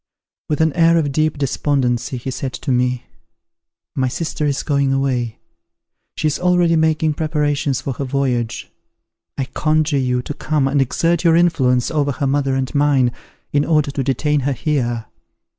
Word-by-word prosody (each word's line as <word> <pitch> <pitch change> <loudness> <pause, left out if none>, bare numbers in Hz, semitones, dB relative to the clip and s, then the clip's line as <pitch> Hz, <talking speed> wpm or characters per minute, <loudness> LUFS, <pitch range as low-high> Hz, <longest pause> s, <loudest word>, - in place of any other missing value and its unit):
With 150 0 0
an 160 -2 +2
air 165 -1 +4
of 150 -4 0
deep 155 +2 0
despondency 135 -3 0
he 130 +2 -5
said 130 0 -4
to 140 - -3
me 125 0 +1 0.9
"My 130 -1 +1
sister 150 +2 -2
is 140 -1 -1
going 140 -2 +1
away; 130 -4 -1 0.8
she - - -3
is 150 - +1
already 180 -2 +3
making 160 -1 +2
preparations 145 -3 -1
for 135 - -3
her 140 - -4
voyage. 130 -4 -2 0.7
I 135 - -1
conjure 155 +1 +1
you 125 -1 0
to 145 - -5
come 150 -2 0
and 140 0 +2
exert 165 +6 +1
your 165 -2 +5
influence 130 -8 +2
over 145 -3 0
her 140 +1 -2
mother 135 -1 +1
and 130 -1 -2
mine, 140 -4 +3 0.4
in 145 0 +3
order 150 -3 +1
to 135 -1 -2
detain 145 +3 +1
her 140 +1 0
here." 120 -5 -1
140 Hz, 165 wpm, -19 LUFS, 130-155 Hz, 0.9 s, your